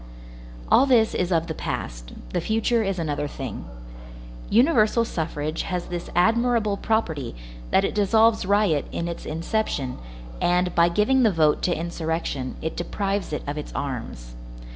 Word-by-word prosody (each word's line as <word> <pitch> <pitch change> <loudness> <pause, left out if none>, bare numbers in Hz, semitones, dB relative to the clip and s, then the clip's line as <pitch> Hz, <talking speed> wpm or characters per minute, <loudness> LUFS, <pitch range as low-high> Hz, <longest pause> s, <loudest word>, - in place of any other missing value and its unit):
All 275 - +6
this 230 -4 +4
is 180 0 -1
of 165 -2 +2
the 165 - -4
past, - - -5 0.2
the - - 0
future 225 +1 +1
is 195 -3 -1
another 145 -3 -2
thing. - - -6 0.8
Universal 230 -2 +4
suffrage 155 -5 -3
has 180 -2 -3
this 175 -1 -5
admirable 225 +2 +3
property, 165 - -1 0.3
that 195 - +3
it - - -2
dissolves 220 +2 +3
riot 195 -6 +2
in 170 - -3
its 170 - -6
inception, 160 -5 -2 0.4
and, 180 0 +2
by 170 0 +4
giving 210 +9 +3
the 230 - +5
vote 155 -4 +2
to 175 - 0
insurrection, 160 -5 -3
it 160 - -3
deprives 195 +2 -2
it 150 - -3
of 145 +1 -3
its 150 - -7
arms. 115 - -5
175 Hz, 150 wpm, -24 LUFS, 155-220 Hz, 0.8 s, All